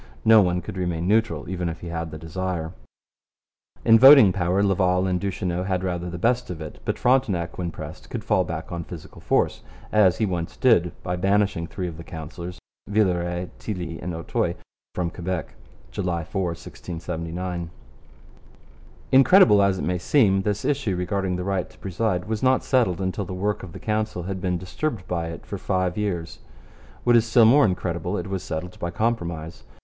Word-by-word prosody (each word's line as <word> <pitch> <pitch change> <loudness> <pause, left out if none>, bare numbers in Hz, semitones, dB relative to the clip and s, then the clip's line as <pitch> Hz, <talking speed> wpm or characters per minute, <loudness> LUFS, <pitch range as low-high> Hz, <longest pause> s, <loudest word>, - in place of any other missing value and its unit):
No 110 -1 +8
one 90 -2 0
could 90 - -7
remain 90 -2 -2
neutral 105 -8 +1
even 90 -1 -2
if 80 0 -7
he 85 - -6
had 80 -1 -4
the 80 - -7
desire. 85 0 -4 1.1
In 115 0 +7
voting 130 -7 +9
power 90 +1 +1
Laval 95 -2 +2
and 90 -1 0
Duchesneau 90 -2 -2
had 95 -1 -1
rather 90 -1 -2
the 90 - -5
best 120 +7 +1
of 90 -3 -5
it, 80 -2 -8
but - - -1
Frontenac 100 -11 +1
when 85 -1 -2
pressed - - -9
could - - -5
fall - - +2
back - - -6
on 85 -1 -4
physical 85 -1 -11
force; - - +1 0.3
as 100 -4 +4
he 110 - +1
once 90 -4 -3
did 100 -9 +4
by 90 - -2
banishing 95 -2 +1
three 90 +1 -4
of 80 -2 -7
the 85 - -8
councillors 85 +3 -8 0.3
Villeray, 90 -4 0
Tilly, 90 -6 -5
and 85 0 -4
Auteuil 85 - -1 0.4
from 85 -2 -1
Quebec 90 -2 -4 0.4
(July 90 -4 -2
4, 95 +4 -3
1679). 85 +2 -5 1.4
Incredible 130 - +7
as 100 -1 +2
it - - -4
may 90 +2 -1
seem, 95 -2 +3
this 105 +1 -2
issue 135 -9 0
regarding 95 +1 -1
the 90 - -3
right 95 -1 -1
to - - -20
preside 95 -1 -1
was 110 0 -3
not 130 0 +3
settled 115 -9 +1
until 95 +1 -2
the 90 - -6
work 105 +3 -1
of 90 - -9
the - - -9
Council 110 -4 -2
had 95 +1 -4
been 90 -1 0
disturbed 90 - -4
by 85 -2 -2
it 80 0 -8
for - - -6
five 90 -1 0
years. 90 -6 -3 0.6
What 120 -1 +4
is 115 - +6
still 115 0 +6
more 135 +6 +6
incredible, 90 0 -2
it - - -4
was 95 -1 -3
settled 90 +3 -5
by 85 - -2
compromise. 85 -6 -2
90 Hz, 185 wpm, -24 LUFS, 85-105 Hz, 1.4 s, voting